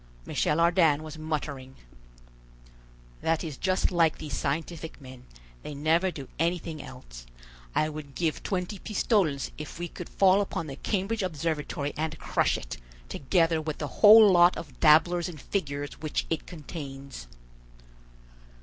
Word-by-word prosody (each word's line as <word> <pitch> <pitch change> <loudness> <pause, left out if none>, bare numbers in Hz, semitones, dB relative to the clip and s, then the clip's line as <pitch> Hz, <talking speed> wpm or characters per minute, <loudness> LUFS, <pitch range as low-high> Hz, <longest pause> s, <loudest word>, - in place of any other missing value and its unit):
Michel 150 - 0
Ardan 165 -3 +4
was 155 0 -9
muttering: 145 -4 -4 1.5
"That 165 -1 0
is 155 -4 -5
just 185 +6 0
like 165 -3 +3
these 150 -3 -5
scientific 160 +3 -3
men: 130 -2 -13 0.3
they 150 - -7
never 160 +6 +2
do 140 -7 -8
anything 165 -2 -1
else. - - -11 0.5
I 155 - +2
would 150 -2 -8
give 165 -3 -1
twenty 185 +1 -3
pistoles 190 - 0
if 150 - -7
we 175 0 -4
could 175 - -9
fall 195 +1 +4
upon 180 -4 -3
the 140 -3 -7
Cambridge 210 +7 -2
Observatory 155 -4 -2
and 160 +1 -3
crush - - +1
it, - - -7 0.3
together 165 +2 +1
with 155 -1 -4
the 145 -4 -7
whole 215 -1 +9
lot 175 0 +5
of 150 -5 -9
dabblers 170 +3 +4
in 165 - -9
figures 145 -5 -4
which 155 -1 -2
it 165 - -2
contains." 140 - -8
160 Hz, 140 wpm, -28 LUFS, 145-175 Hz, 1.5 s, whole